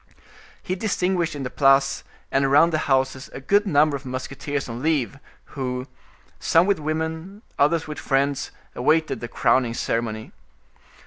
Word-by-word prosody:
He 185 Hz, -, -2 dB
distinguished 180 Hz, -4 st, 0 dB
in 140 Hz, -, -5 dB
the 125 Hz, -, -4 dB
Place 135 Hz, -1 st, +3 dB, 0.3 s
and 135 Hz, -, +2 dB
around 145 Hz, +5 st, +5 dB
the 155 Hz, -, +2 dB
houses 130 Hz, 0 st, +1 dB
a -, -, -6 dB
good 205 Hz, +9 st, +2 dB
number 150 Hz, -3 st, +3 dB
of 135 Hz, -, -6 dB
musketeers 135 Hz, +2 st, -4 dB
on 120 Hz, 0 st, -6 dB
leave, 145 Hz, -3 st, 0 dB, 0.3 s
who, 125 Hz, -2 st, -3 dB, 0.5 s
some 165 Hz, +2 st, +4 dB
with 200 Hz, -2 st, +1 dB
women, 160 Hz, +6 st, -4 dB, 0.2 s
others 155 Hz, +3 st, +2 dB
with 150 Hz, -, -6 dB
friends, 140 Hz, 0 st, 0 dB, 0.2 s
awaited 155 Hz, +5 st, +1 dB
the 120 Hz, -, -5 dB
crowning 120 Hz, 0 st, +1 dB
ceremony. 110 Hz, -2 st, -2 dB
140 Hz, 145 wpm, -23 LUFS, 130-160 Hz, 0.5 s, around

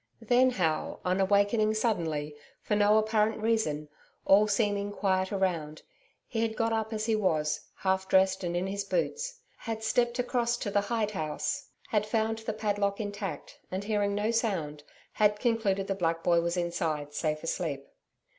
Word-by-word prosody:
Then, 245 Hz, +3 st, +4 dB
how 165 Hz, -10 st, -1 dB
on 185 Hz, +1 st, +2 dB
awakening 205 Hz, +3 st, +3 dB
suddenly, 160 Hz, -10 st, -1 dB, 0.3 s
for 210 Hz, -, 0 dB
no 210 Hz, +1 st, +5 dB
apparent 220 Hz, 0 st, +2 dB
reason, 215 Hz, -10 st, 0 dB, 0.4 s
all 205 Hz, +2 st, +6 dB
seeming 205 Hz, -1 st, 0 dB
quiet 190 Hz, -2 st, 0 dB
around, 170 Hz, -6 st, -1 dB, 0.4 s
he 225 Hz, -, -2 dB
had 225 Hz, -1 st, 0 dB
got 225 Hz, 0 st, 0 dB
up 220 Hz, 0 st, -1 dB
as 215 Hz, -1 st, -2 dB
he 225 Hz, -1 st, +2 dB
was, 155 Hz, -8 st, +1 dB
half 190 Hz, 0 st, -1 dB
dressed 190 Hz, 0 st, +3 dB
and 175 Hz, 0 st, -1 dB
in 180 Hz, -, -1 dB
his 200 Hz, +1 st, -2 dB
boots -, -, -2 dB, 0.2 s
had 225 Hz, -1 st, -5 dB
stepped 240 Hz, +2 st, +1 dB
across 240 Hz, -1 st, 0 dB
to 205 Hz, -, -3 dB
the 205 Hz, -, +3 dB
hide 215 Hz, 0 st, -1 dB
house, 155 Hz, -6 st, -3 dB, 0.2 s
had 210 Hz, -1 st, +1 dB
found 220 Hz, 0 st, 0 dB
the 225 Hz, 0 st, -4 dB
padlock 205 Hz, -1 st, -1 dB
intact 205 Hz, -7 st, -5 dB
and, 190 Hz, +2 st, -3 dB
hearing 205 Hz, -1 st, 0 dB
no 210 Hz, +2 st, +1 dB
sound, 185 Hz, -11 st, -1 dB, 0.3 s
had 210 Hz, 0 st, +2 dB
concluded 215 Hz, -5 st, +1 dB
the 195 Hz, -, -1 dB
black 165 Hz, -3 st, -1 dB
boy 170 Hz, -1 st, +4 dB
was 170 Hz, +1 st, -1 dB
inside 165 Hz, -4 st, -2 dB
safe 155 Hz, 0 st, -1 dB
asleep. 155 Hz, -4 st, -3 dB
205 Hz, 165 wpm, -29 LUFS, 175-220 Hz, 0.4 s, all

